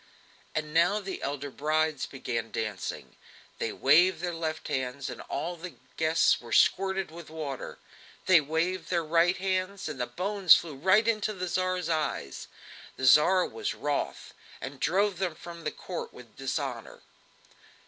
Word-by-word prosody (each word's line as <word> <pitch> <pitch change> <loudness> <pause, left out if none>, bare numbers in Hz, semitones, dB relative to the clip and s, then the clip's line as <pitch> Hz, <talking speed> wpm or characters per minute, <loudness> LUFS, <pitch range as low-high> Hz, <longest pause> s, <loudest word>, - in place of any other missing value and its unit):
And 150 -1 -2
now 170 +6 +4
the 195 -2 -6
elder 140 0 -4
brides 155 0 0
began 115 -4 -4
dancing. 105 -5 -5 0.4
They - - -1
waved 165 +5 +4
their 175 0 -3
left 160 -1 -4
hands 130 -1 -3
and - - -8
all 175 +2 -3
the 175 +1 -9 0.2
guests 160 +1 +3
were 120 -1 -11
squirted 190 - +3
with 170 -1 -10
water; 150 -4 -6 0.5
they 185 -4 +6
waved 165 +4 -1
their 170 -2 +1
right 165 +3 +3
hands 190 +1 -2
and 130 - -5
the 120 - -1
bones 190 +6 +5
flew 165 -3 -3
right 190 +10 +3
into 215 -1 +1
the 185 -2 -4
Tsar's 185 0 -1
eyes. 155 - -2 0.5
The 130 - -3
Tsar 150 +8 +6
was 425 -2 -4
wroth, - - -3 0.3
and - - -7
drove 200 -2 +1
them 180 -4 -1
from 170 -2 -6
court 180 +3 -6
with 120 -3 -15
dishonour. 135 -3 -4
165 Hz, 150 wpm, -28 LUFS, 145-185 Hz, 0.5 s, they